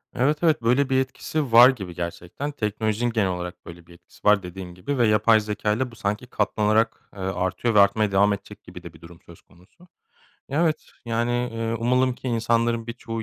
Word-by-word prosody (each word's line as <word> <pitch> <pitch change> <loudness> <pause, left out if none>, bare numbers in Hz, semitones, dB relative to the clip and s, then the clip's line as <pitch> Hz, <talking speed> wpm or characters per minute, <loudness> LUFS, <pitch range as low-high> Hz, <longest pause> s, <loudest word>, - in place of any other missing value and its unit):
Evet, 140 +4 +2
evet, 155 -6 +3
böyle 125 +4 +2
bir 130 - +3
etkisi 135 0 -4
var 120 +3 +9
gibi 95 -10 -5
gerçekten. 90 +11 -5
Teknolojinin 110 -1 -2
genel 110 -4 +1
olarak 90 -1 -6
böyle 85 0 -12
bir 85 - -15
etkisi 85 +1 -22
var 105 -2 +4
dediğin 90 0 -8
gibi 115 +11 -4
ve 120 -3 +3
yapay 110 +1 +4
zekâyla 105 +3 -2
bu 115 - -14
sanki 105 +2 -3
katlanarak, 110 +1 0
eee, - - -11
artıyor 95 +4 -1
ve - - +7
artmaya 100 +1 +3
devam 100 +1 +3
edecek 100 0 -9
gibi - - -12
de - - -10
bir - - -18
durum 85 0 -14
söz 85 - -15
konusu. 95 - -23 0.6
Evet, 155 +2 0 0.2
yani, 115 0 -1 0.2
eee, 115 0 -2
umalım 125 +1 +1
ki 130 - -6
insanların 115 0 0
birçoğu 115 -1 -6
110 Hz, 190 wpm, -24 LUFS, 95-120 Hz, 0.6 s, var